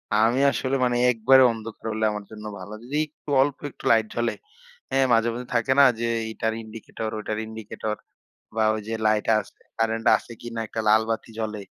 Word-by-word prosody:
আমি 115 +4 +3
আসলে 130 0 -1
মানে, 120 0 +1
একবারে 130 +3 +5
অন্ধকার 115 0 -9
হলে 110 0 0
আমার 105 -1 -5
জন্য 105 0 -9
ভালো। 95 +3 -9
যদি 135 +5 -6
একটু 150 0 -15
অল্প 140 +1 +1
একটু - - -17
লাইট 110 -1 +4
জ্বলে, 120 0 0 0.6
হ্যাঁ, 135 0 +3
মাঝে, 115 0 +3
মাঝে 125 +1 -6
থাকে 120 +2 +2
না - - +9 0.2
যে 120 - -1 0.2
এইটার 110 0 -2
ইন্ডিকেটর, 110 0 -6
ওইটার 105 0 -3
ইন্ডিকেটর 110 -1 -5 0.6
বা 110 - +2
ওই 110 - -4
যে 115 - -3
লাইট 110 -1 +2
আছে, - - -11 0.2
কারেন্ট 115 0 0
আছে - - -13
কিনা, 115 -1 -6
একটা 110 - -3
লাল 110 +1 +6
বাতি 115 +1 -2
জ্বলে? 105 -2 -3
115 Hz, 190 wpm, -25 LUFS, 110-120 Hz, 0.6 s, না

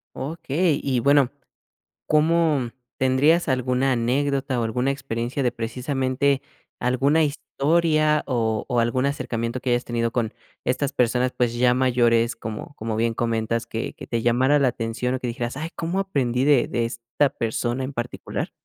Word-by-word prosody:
Okey. 155 +2 -1
Y 130 -3 +1
bueno, 140 0 +4 0.8
¿cómo 155 -5 +2 0.3
tendrías 140 +7 +3
alguna 130 0 +1
anécdota 130 +2 0
o - - 0
alguna 125 +4 0
experiencia 130 -1 -2
de 125 - +2
precisamente, 130 +3 -1 0.4
alguna 140 +6 +2
historia, 155 +1 +1
o 110 -4 0
o, 120 -1 +1
algún 120 +3 +1
acercamiento 120 -4 -2
que 130 - -3
hayas 120 0 +1
tenido 115 -1 0
con 115 -2 -1 0.3
estas 135 +2 -1
personas, 125 +1 +2
pues, 120 -1 +1
ya 125 +1 +3
mayores, 120 -2 +2
como 110 +5 -7
como 110 -3 -3
bien 115 +1 +1
comentas, 115 0 -1
que 115 - -4
que - - -10
te 115 -1 -2
llamara 130 +5 +3
la 140 -3 +3
atención 120 +1 -2
o 130 - -1
que 125 - -4
dijeras: 120 +2 -3
"Ay, 160 +2 -4
cómo 170 +3 -2
aprendí 130 -10 0
de 140 -4 +4
de 120 -1 -1
esta 120 +4 0
persona 120 +3 -2
en 135 +2 -5
particular?". 120 0 -4
125 Hz, 160 wpm, -23 LUFS, 120-140 Hz, 0.8 s, bueno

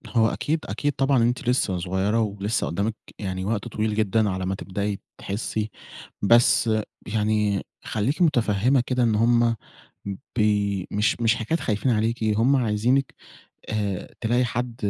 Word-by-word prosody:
هو 110 -1 +5
أكيد، 155 +6 -1
أكيد 145 -1 -1
طبعًا 135 -2 +2
أنتِ 120 +1 0
لسه 100 -7 +1
صغيرة 95 +5 0
ولسه 105 +1 -1
قُدّامِك 100 +6 -1 0.2
يعني 95 -2 -3
وقت 105 -1 -2
طويل 110 0 -1
جدًا 110 0 +2
على 95 0 -2
ما 95 +1 -1
تبدئي 100 +1 -3 0.2
تحسّي. 105 +1 -3 0.5
بس 115 +2 +5 0.4
يعني 105 -2 +1 0.2
خلّيكِ 125 - -1
متفهّمة 125 - +3
كده 125 -1 +1
إن 110 -2 +2
هُم 115 +1 +3 0.8
ب - - +3 0.5
مش 105 +3 +1
مش 115 0 +3
حكاية 120 +9 -1
خايفين 110 +3 0
عليكِ، 115 +1 0
هُم 115 +6 +3
عايزينِك 125 +3 +1 0.5
آآ، 105 -4 -3
تلاقي 120 +2 +2
حد 120 +1 -3
110 Hz, 140 wpm, -24 LUFS, 105-120 Hz, 0.8 s, هو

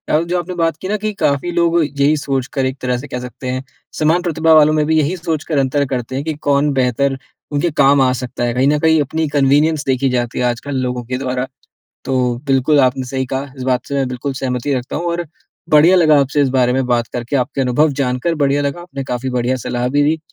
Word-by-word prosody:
आप 160 - +2
जो 180 +1 0
आपने 180 +1 -5
बात 165 -2 +1
की 185 - -4
ना 210 - 0
कि 215 - 0
काफ़ी 140 +5 +1
लोग 170 0 +2 0.2
यही 145 +2 +3
सोचकर 135 -1 -2
एक 130 +1 -2
तरह 125 -1 0
से 145 +4 -8
कह 125 - -5
सकते 125 +1 -8
हैं, 130 +1 -3 0.4
समान 160 +3 +3
प्रतिभा 165 -2 +2
वालों 155 0 +6
में 155 -1 +2
भी 160 +1 +2
यही 155 +5 0
सोच 165 -2 -3
कर 155 -4 -2
अंतर 140 +2 +1
करते 125 0 -3
हैं 140 - -2
कि 160 - -1
कौन 140 +1 +3
बेहतर 135 +1 +1 0.3
उनके 150 +3 0
काम 140 0 +5
आ 130 -1 +3
सकता 125 -1 -4
है, 120 -1 0
कहीं 130 +3 +2
न 150 +1 +2
कहीं 160 0 +3
अपनी 160 +3 -1
कन्वीनियंस 145 +3 +2
देखी 135 0 +1
जाती 120 -1 -3
है 125 - +1
आजकल 125 +4 -2
लोगों 125 -1 -3
के 130 +2 -3
द्वारा। 130 0 -2 0.6
तो 130 0 0 0.3
बिल्कुल 135 +2 +3
आपने 130 0 +2
सही 130 +1 -3
कहा 135 +2 -4
इस 130 - -6
बात 125 - -1
से 140 - -3
मैं 135 -2 0
बिल्कुल 130 +2 -4
सहमति 130 +1 -1
रखता 125 -1 -3
हूँ 170 - -3
और 175 0 -3 0.4
बढ़िया 155 +5 +6
लगा 155 -4 +5
आपसे 140 +2 0
इस 135 - +2
बारे 125 -1 +2
में 130 -1 0
बात 120 -2 +1
करके 120 +3 -3
आपके 130 +1 -1
अनुभव 140 +5 +2
जानकर 125 +6 -1
बढ़िया 145 -1 +1
लगा, 140 +4 -3
आपने 140 -6 -7
काफ़ी 125 0 -3
बढ़िया 125 0 0
सलाह 120 0 -1
भी 145 +2 +2
दी। 155 +2 +1
140 Hz, 240 wpm, -17 LUFS, 125-155 Hz, 0.6 s, वालों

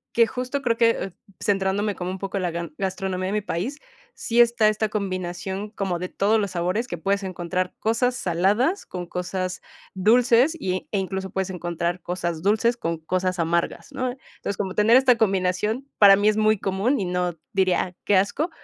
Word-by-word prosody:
Que, 230 - +6
justo, 255 +4 -3
creo 235 -3 +1
que, 230 -1 +5
eh, 195 - -4 0.3
centrándome 200 +1 0
como 180 0 -4
un 190 - -5
poco 195 +1 -3
en 185 - -2
la 175 - 0
gan 170 -2 -5
gastronomía 190 -1 -2
de 195 - -2
mi 210 - 0
país, 205 - -3 0.4
sí 235 +1 +2
está 235 -2 +4
esta 215 0 +1
combinación 190 0 -3
como 195 -5 -3
de 180 - -4
todos 215 +3 +2
los 200 -3 -2
sabores 185 +7 -1
que 175 - -5
puedes 200 +4 0
encontrar, 180 0 -3
cosas 245 +3 +1
saladas 205 - +1
con 180 -1 -5
cosas 180 +1 -4 0.3
dulces 240 - +4
y 185 -4 -2
e 205 - 0
incluso 190 0 -3
puedes 190 0 -2
encontrar 175 0 -3
cosas 175 -2 -3
dulces 220 +5 +2
con 165 -7 -2
cosas 185 +3 -1
amargas, 170 +1 -1
¿no? 255 -1 -2 0.3
Entonces, 200 - -4
como 190 -2 -2
tener 220 +4 +5
esta 260 -2 +5
combinación, 210 +5 0
para 200 -2 +9
mí, 205 +2 +3
es 215 - 0
muy 215 0 +3
común 200 +8 0
y 195 - -1
no 180 -1 -1 0.2
diría: 185 -1 +1
"Qué 205 - +3
asco". 205 - +1
195 Hz, 190 wpm, -24 LUFS, 180-220 Hz, 0.4 s, para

